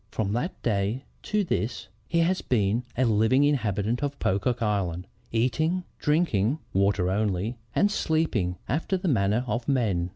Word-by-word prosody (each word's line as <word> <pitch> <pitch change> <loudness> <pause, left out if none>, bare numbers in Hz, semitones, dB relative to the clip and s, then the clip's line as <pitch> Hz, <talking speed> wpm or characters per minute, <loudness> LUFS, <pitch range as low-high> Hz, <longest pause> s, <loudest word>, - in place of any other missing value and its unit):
From 105 -3 -2
that 150 - -2
day 105 +3 0 0.2
to 210 -1 0
this, 115 - -2 0.2
he 170 0 +2
has 180 +3 +1
been 110 0 +1
a 130 - +3
living 110 +5 +3
inhabitant 115 -5 +1
of 145 -1 -2
Pocock 115 +6 0
Island, 95 -5 -1 0.3
eating, 155 +10 +1 0.2
drinking, 150 - +2 0.2
(water 95 -1 +2
only) 105 +3 -1 0.2
and 205 - +3
sleeping 155 - 0
after 165 - 0
the 185 +1 -3
manner 110 - +2
of 115 +1 -2
men. 100 -10 +1
115 Hz, 150 wpm, -26 LUFS, 100-145 Hz, 0.3 s, a